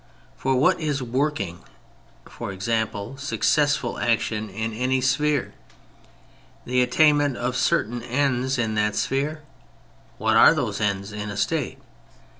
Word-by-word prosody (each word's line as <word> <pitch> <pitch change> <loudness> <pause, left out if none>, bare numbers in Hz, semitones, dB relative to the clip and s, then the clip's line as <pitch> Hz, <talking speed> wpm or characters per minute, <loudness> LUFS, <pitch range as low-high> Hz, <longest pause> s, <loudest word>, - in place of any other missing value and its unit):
For 135 - 0
what 170 +8 +3
is 150 -4 -1
^^ 125 - -5
working," 120 - -1 0.7
i. - - -7
e. 110 +3 -2
successful 140 -2 +1
action, 110 -2 0
in 110 +3 -4
any 130 +3 0
spliere? 145 +2 +1 1.1
The 125 +1 +2
attainment 145 +1 +3
of 125 +1 -2
certain 120 -2 0
ends 130 +1 0
in 115 -3 0
that 105 -1 0
sphere. 145 +7 -1 0.7
What - - +2
are - - +7
those - - -2
ends 100 -1 -1
in 105 0 -5
a 100 - -6
State - - -1
125 Hz, 130 wpm, -24 LUFS, 110-140 Hz, 1.1 s, are